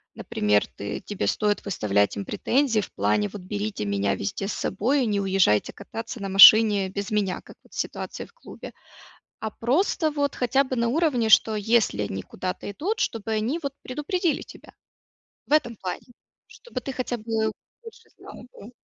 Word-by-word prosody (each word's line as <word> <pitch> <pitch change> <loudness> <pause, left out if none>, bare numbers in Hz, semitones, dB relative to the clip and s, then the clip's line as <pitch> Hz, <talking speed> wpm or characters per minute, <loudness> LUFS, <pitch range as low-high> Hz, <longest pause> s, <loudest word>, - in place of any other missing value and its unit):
например, 105 0 +1
ты 100 0 -6
тебе 205 - -4
стоит 210 -1 0
выставлять 100 - 0
им 100 - -4
претензии 250 -5 +1
в - - -8
плане: 105 +1 0
"Вот 205 - -9
берите 205 - -4
меня 100 0 0
везде 195 - -4
с - - -2
собой 255 +8 0
и - - 0
не 205 -2 0
уезжайте 190 - +2
кататься 225 +3 -8
на 200 - -3
машине 200 0 +8
без 200 +3 -5
меня", 205 -3 0
как - - -15
вот - - -24
в - - -7
ситуации - - -4
в - - -22
клубе, - - -11 0.7
а 220 - -2
просто 310 - +1
вот 285 -1 -1
хотя 255 +2 +2
бы 260 -1 -4
на 235 0 +1
уровне, 270 -4 +1
что 220 0 +5
если 210 - +1
они 95 -1 -4
куда-то 185 +2 -5
идут, 375 - -2
чтобы 225 -1 -2
они 230 +10 -1
вот 280 -3 -4
предупредили 310 +5 -1
тебя - - -15 0.7
в - - -8
этом 240 -7 +2
плане, 185 -2 -6 0.4
чтобы 480 - -8
ты 270 - -5
хотя 255 -1 -3
бы 220 0 -1 0.3
больше 455 -1 -14
знал - - -12 0.2
бы. 215 - -12
220 Hz, 180 wpm, -25 LUFS, 190-260 Hz, 0.7 s, машине